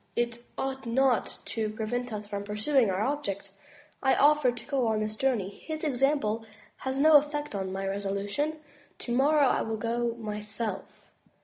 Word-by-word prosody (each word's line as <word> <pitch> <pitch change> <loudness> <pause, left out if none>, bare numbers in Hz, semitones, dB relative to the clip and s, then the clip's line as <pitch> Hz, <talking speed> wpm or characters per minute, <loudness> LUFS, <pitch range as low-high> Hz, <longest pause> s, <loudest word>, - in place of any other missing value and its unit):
It 235 0 0 0.2
ought 265 -2 -3
not 255 0 +2
to 220 -2 -2
prevent 230 +3 -3
us 210 -1 -5
from 200 -1 -4
pursuing 215 +4 +2
our 190 +1 0
object. 210 -8 -2 0.5
I 265 -1 +4
offered 290 -4 +4
to 235 - -8
go 265 -4 0
on 220 -1 +1
this 215 0 -2
journey. 230 -6 +1
His 310 +8 -7
example 270 -6 +1 0.3
has 265 0 -3
no 305 +2 +8
effect 295 -1 -2
on 190 -2 -3
my 195 +1 -3
resolu 200 0 -2
tion. 295 +9 -1 0.4
Tomorrow 280 +4 +3
I - - +2
will 225 0 -2
go 235 +1 -1
myself." 210 -1 -4
235 Hz, 165 wpm, -29 LUFS, 210-270 Hz, 0.5 s, no